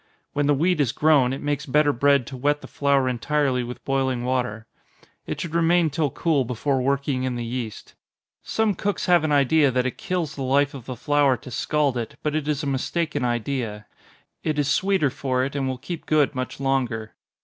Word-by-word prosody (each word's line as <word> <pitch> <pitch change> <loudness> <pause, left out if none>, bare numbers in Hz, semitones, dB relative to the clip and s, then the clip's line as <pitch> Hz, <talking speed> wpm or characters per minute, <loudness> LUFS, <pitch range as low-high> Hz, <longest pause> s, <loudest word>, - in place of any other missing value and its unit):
When 145 0 +1
the 145 - +4
wheat 170 +2 +2
is 125 -5 +1
grown, 145 -5 +4
it 135 - -5
makes 145 0 -2
better 145 +2 +3
bread 140 +1 +3
to 135 - -8
wet 145 +3 0
the - - -10
flour 140 -2 +1
entirely 130 +1 0
with 120 +1 -8
boiling 130 -2 0
water. 125 -4 -1 0.6
It 150 - -4
should 165 -1 -5
remain 170 -1 +3
till 150 0 0
cool 150 -1 +1
before 130 +3 -1
working 140 0 0
in 130 -1 -1
the 120 -1 -3
yeast. 115 -3 -5 0.5
Some 220 -2 0
cooks 200 +2 -2
have 175 -3 +4
an 155 - 0
idea 145 +1 +4
that 125 0 0
it 130 - -3
kills 180 -8 -2
the 140 - -6
life 140 +2 +2
of 130 -4 -9
the 130 - -4
flour 145 -1 +2
to 125 +2 -11
scald 145 +1 0
it, 115 -2 -4
but 150 - 0
it 155 -1 -2
is 150 0 -1
a - - -2
mistaken 145 +2 -1
idea 120 -3 -2 0.6
it 155 -2 -1
is 145 -2 +1
sweeter 185 -2 +2
for 130 -1 -1
it, 140 - -6
and 135 -2 -1
will 130 -1 -2
keep 160 +5 -7
good 150 -2 +3
much 130 0 -4
longer. 125 -5 -1
140 Hz, 205 wpm, -24 LUFS, 130-150 Hz, 0.6 s, the